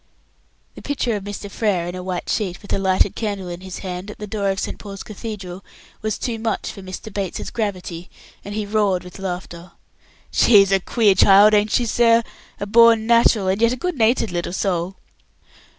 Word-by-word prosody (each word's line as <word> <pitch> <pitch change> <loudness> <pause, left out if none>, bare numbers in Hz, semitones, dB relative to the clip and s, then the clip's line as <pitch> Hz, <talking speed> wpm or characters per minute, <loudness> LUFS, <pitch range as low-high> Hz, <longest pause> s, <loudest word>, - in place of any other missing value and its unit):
The - - -11
picture 260 -5 -1
of 200 -1 -5
Mr. 205 0 -6
Frere 200 -4 -1
in 175 - -5
a 180 - -6
white 180 -1 -4
sheet, 195 -4 -2
with 205 - -5
a - - +1
lighted 190 -1 +2
candle 200 -4 -3
in 175 +1 -7
his 185 -1 -7
hand, 180 +2 -5
at 210 - -9
the 210 - -6
door 200 -1 -2
of 195 0 -1
St. - - -4
Paul's 195 -2 -8
Cathedral, 200 -4 -7 0.4
was 215 -1 -2
too 235 -3 -3
much 225 0 -2
for 200 - -11
Mr. 190 +3 -8
Bates's 195 -3 -4
gravity, 185 -5 -4 0.3
and 205 +1 -7
he 215 -1 -2
roared 205 -3 +1
with 180 +2 -12
laughter. 180 -2 -6 0.6
"She's 200 -4 +5
a 195 - +4
queer 210 +1 +3
child, 200 +3 +6
ain't 210 0 +3
she, 240 - +1
sir? 230 0 +4 0.4
A 205 - -3
born 225 +1 +5
natural, 230 -3 +4
and 190 +3 0
a 230 +2 +3
good 355 +7 -3
natured 230 -3 +2
little 175 0 -3
soul." 185 -1 -1
200 Hz, 195 wpm, -21 LUFS, 185-220 Hz, 0.6 s, child